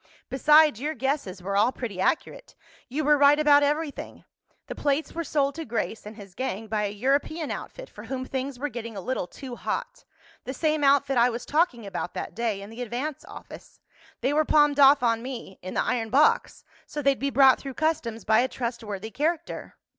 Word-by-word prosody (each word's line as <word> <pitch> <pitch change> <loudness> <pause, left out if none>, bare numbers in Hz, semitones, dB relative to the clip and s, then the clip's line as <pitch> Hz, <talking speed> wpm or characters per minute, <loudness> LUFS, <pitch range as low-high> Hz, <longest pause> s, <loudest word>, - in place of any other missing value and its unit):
"Besides, 300 -2 +5
your 305 +2 -2
guesses 255 -8 -2
were 195 +1 -2
all 215 +5 +4
pretty 220 -8 -5
accurate. 315 - -2 0.3
You 295 +5 -2
were 295 0 +4
right 285 +1 +6
about 295 -1 +5
everything. 295 +1 -2 0.4
The - - -6
plates 290 +2 -1
were 335 - -3
sold 280 -2 0
to 325 - -6
Grace 225 -4 -4
and 215 - -9
his 200 -4 -12
gang 225 -2 -4
by 215 -1 -1
a - - -1
European 280 +8 -1
outfit - - -7
for - - -12
whom 260 -1 -4
things 265 0 -4
were 290 +4 -2
getting 230 -3 -7
a - - -3
little 195 -1 -3
too 260 +2 -9
hot—the 265 - -7
same 310 0 0
outfit 275 -1 +3
I 240 +1 +5
was 235 0 -5
talking 295 - +1
about 195 -2 -5
that - - -5
day 220 -4 -2
in 205 - -11
the 230 +2 -8
Advance 250 +5 -4
office. - - -12 0.4
They 260 +4 +1
were 310 +1 +3
palmed 295 -1 +3
off 275 0 +7
on 230 -1 +2
me, 240 -6 -8
in 185 - -7
the - - +2
iron 230 -3 -1
box, 285 +5 +2 0.2
so 295 - -5
they'd 275 -1 +2
be 280 - 0
brought 270 -1 +5
through 270 -2 -7
customs 235 - -1
by 220 0 +4
a 250 - +2
trustworthy 225 -5 -5
character." 325 +5 -3
265 Hz, 200 wpm, -26 LUFS, 225-295 Hz, 0.4 s, off